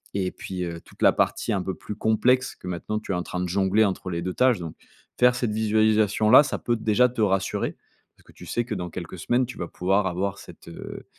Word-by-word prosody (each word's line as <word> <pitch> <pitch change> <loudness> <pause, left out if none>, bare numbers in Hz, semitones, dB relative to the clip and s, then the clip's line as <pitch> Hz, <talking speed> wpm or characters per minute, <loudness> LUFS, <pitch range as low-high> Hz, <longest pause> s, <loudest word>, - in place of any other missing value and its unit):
et 95 -2 -1
puis, 90 -1 -6
heu, 85 -1 -5
toute - - -10
la - - +6
partie - - 0
un 95 - 0
peu 95 0 -4
plus 105 - -8
complexe, 125 +5 +2
que - - -15
maintenant 90 +4 -3
tu 110 - -6
es - - 0
en 90 - -1
train 90 - -5
de 90 - -1
jongler 100 +4 +2
entre 95 -1 -3
les 85 -1 -3
2 90 - -3
tâches. 125 +1 +3
Donc 85 -3 -7 0.4
faire 125 0 +5
cette 120 -3 -1
visualisation 110 0 +2
là, 130 - +10
ça 150 - -2
peut 120 - -1
déjà 110 +2 +3
te 120 -2 -4
rassurer, 95 -2 0 0.4
parce - - -24
que - - -18
tu - - -13
sais 120 - -1
que 115 - -4
dans 90 -3 -4
quelques 85 +1 -7
semaines 120 +10 +1
tu 125 - -10
vas 85 - -3
pouvoir 95 +2 0
avoir 95 +2 -2
cette, - - -14
heu 85 - -9
100 Hz, 245 wpm, -25 LUFS, 90-110 Hz, 0.4 s, là